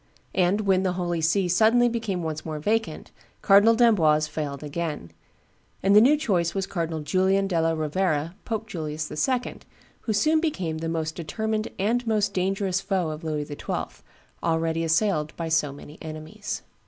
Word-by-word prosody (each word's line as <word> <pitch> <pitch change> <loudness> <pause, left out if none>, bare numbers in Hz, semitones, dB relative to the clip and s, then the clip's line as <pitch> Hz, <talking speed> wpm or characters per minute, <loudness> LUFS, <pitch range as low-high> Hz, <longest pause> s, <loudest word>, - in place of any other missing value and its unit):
and, 190 +3 +2
when 190 -2 +2
the 185 -1 0
Holy 175 -2 -2
See 180 +4 +2
suddenly 225 +7 +4
became 220 -7 -2
once 155 -1 -4
more 155 -1 -4
vacant, 220 +9 -2 0.3
Cardinal 205 +3 +6
d'Amboise 165 -11 +4
failed 150 -2 -5
again; 150 - -4 0.7
and 195 +1 +4
the 210 - +9
new 280 +6 +5
choice 180 - 0
was 195 -1 0
Cardinal 165 -4 -3
Julian 190 +5 +2
della 165 -3 +1
Rovera, 155 0 -1
Pope 220 -1 -3
Julius 155 -6 -5
II., 250 - -1 0.4
who 225 - -3
soon 310 +9 +3
became 185 - -2
the 165 0 -3
most 160 -1 -2
determined 215 +7 -2
and 230 +5 0
most 210 -2 +1
dangerous 190 0 0
foe 185 -6 -1
of 155 +2 -7
Louis 150 -2 -2
XII., 145 -1 -5 0.4
already 165 0 0
assailed 160 -2 +1
by 165 -1 -3
so 150 -2 +1
many 145 +2 -12
enemies. 155 -1 -6
175 Hz, 160 wpm, -25 LUFS, 155-205 Hz, 0.7 s, the